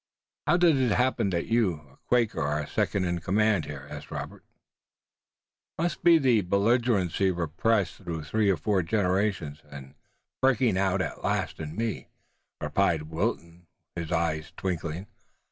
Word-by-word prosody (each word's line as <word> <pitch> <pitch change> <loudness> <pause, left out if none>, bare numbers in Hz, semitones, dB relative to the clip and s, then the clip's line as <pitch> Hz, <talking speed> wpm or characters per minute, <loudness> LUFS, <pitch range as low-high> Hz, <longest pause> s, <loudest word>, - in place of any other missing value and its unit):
"How 175 - +4
does 170 -5 +4
it 125 -5 +2
happen 125 -4 +1
that 85 -2 -1
you, 115 -5 +2 0.2
a - - -24
Quaker, 120 -3 +2
are 75 +1 -1
second 95 +5 0
in 85 -1 -1
command 100 0 +2
here?" 70 -2 -8
asked - - -8
Robert. - - -7 1.3
"It - - -3
must 175 - -2
be 170 -1 +7
the 125 -7 +3
belligerency 100 -1 +2
repressed 90 +3 0
through 80 -2 -5
three 105 +7 +1
or 95 - +3
four 95 +5 +1
generations 90 -4 0
and 70 -2 -10 0.5
breaking 125 -5 +3
out 95 -1 +1
at 75 - -6
last - - -1
in 80 0 -6
me," 115 +1 -3 0.5
replied 80 0 0
Wilton, 85 +1 -3 0.3
his 85 -2 -5
eyes 80 -2 -1
twinkling. 85 -1 -3
95 Hz, 145 wpm, -27 LUFS, 80-110 Hz, 1.3 s, be